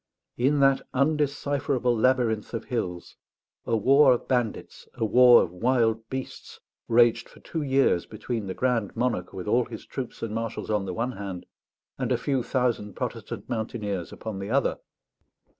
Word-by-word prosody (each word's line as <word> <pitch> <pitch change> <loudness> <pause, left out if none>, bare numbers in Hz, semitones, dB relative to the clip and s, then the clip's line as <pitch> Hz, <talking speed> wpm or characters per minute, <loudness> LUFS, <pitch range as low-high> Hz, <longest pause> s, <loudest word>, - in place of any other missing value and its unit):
In 140 +4 +2
that 135 0 +4
undecipherable 140 -3 +1
labyrinth 115 -2 +1
of 115 - -5
hills, 90 -8 -4 0.5
a 115 - +2
war 135 +4 +6
of 120 - -4
bandits, 120 -4 -2
a 115 - -1
war 125 +2 +7
of - - -5
wild 115 +2 +1
beasts, 130 0 -7 0.3
raged 115 0 +3
for - - -17
two 160 - -5
years 135 - +2
between 110 -1 -4
the 95 - -4
Grand 120 -6 0
Monarch 120 -8 -1
with 95 +2 -7
all 120 +3 +3
his 110 -3 -9
troops 130 -3 -6
and 110 -2 -3
marshals 115 -1 -4
on 105 -2 0
the 90 - -3
one 120 +3 -1
hand, 95 -5 -7 0.5
and - - -1
a - - +3
few 135 -3 0
thousand 120 -5 -1
Protestant - - -5
mountaineers 110 -6 -3
upon 110 -3 -6
the 100 +1 -5
other. 135 +3 +1
120 Hz, 160 wpm, -26 LUFS, 110-130 Hz, 0.5 s, war